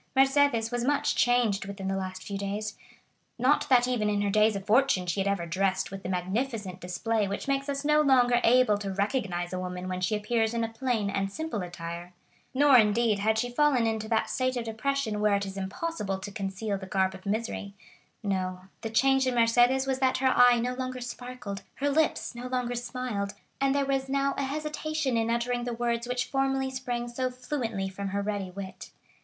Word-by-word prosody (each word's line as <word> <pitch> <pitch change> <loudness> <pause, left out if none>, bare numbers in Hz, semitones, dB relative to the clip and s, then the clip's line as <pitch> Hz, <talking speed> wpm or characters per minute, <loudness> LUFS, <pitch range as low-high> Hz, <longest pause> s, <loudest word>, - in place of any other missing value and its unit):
Mercédès 270 -4 +4
was 240 -1 -1
much 285 +3 +1
changed 240 -5 +2
within 195 -1 -5
the 195 - 0
last 185 -1 -4
few 200 - -5
days; 205 +2 -3 0.6
not 275 +4 +2
that 250 -2 +5
even 230 -4 +1
in 205 0 +1
her 200 - 0
days 215 +1 +4
of 195 -1 -5
fortune 220 -3 +3
she 175 +2 -1
had 195 - +1
ever 200 -4 0
dressed 190 +3 0
with 195 0 -6
the 185 - -5
magnificent 190 +1 -2
display 210 +4 -1
which 200 +6 -4
makes 275 0 0
us 280 0 -2
no 300 0 +5
longer 245 -4 +4
able 235 -3 +4
to 200 -1 -4
recognize 195 -4 -1
a 185 - -2
woman 180 0 -5
when 185 0 -3
she 185 +4 +1
appears 225 +1 0
in 230 - 0
a - - 0
plain 225 -3 -1
and 195 0 -1
simple 315 -3 -3
attire; 175 0 -7 0.4
nor 275 -1 +6
indeed, 215 0 +3
had 220 +2 +2
she 245 - +1
fallen 265 -2 +3
into 220 -1 -1
that 225 0 +1
state 255 -1 -1
of 240 - -2
depression 225 0 -1
where 210 -1 +3
it 200 0 -1
is 195 0 -7
impossible 195 +2 -3
to 205 +2 -7
conceal 195 +1 -3
the 190 - -8
garb 190 -1 +1
of 190 +1 -10
misery; 205 -1 -3 0.5
no, 185 -2 -2 0.2
the 225 - -3
change 270 +3 +3
in 255 - 0
Mercédès 240 +3 +4
was 265 -1 -1
that 260 -1 +2
her 260 0 +3
eye 245 -1 +7
no 245 +2 -1
longer 255 0 -4
sparkled, 245 -4 -6
her 285 +1 0
lips 310 -2 +1
no 245 +1 -6
longer 250 -1 -1
smiled, 240 -5 -3 0.3
and 275 0 +2
there 280 -1 +2
was 270 -1 -1
now 275 0 +1
a 275 - -1
hesitation 305 -1 -2
in 225 0 +1
uttering 240 +1 0
the 245 0 -3
words 235 0 -1
which 250 0 -1
formerly 270 -1 0
sprang 245 -2 -3
so 255 +2 -2
fluently 245 -6 -3
from 195 +1 -5
her 200 +1 -2
ready 200 -2 -2
wit. 190 +1 -8
230 Hz, 205 wpm, -28 LUFS, 200-255 Hz, 0.6 s, eye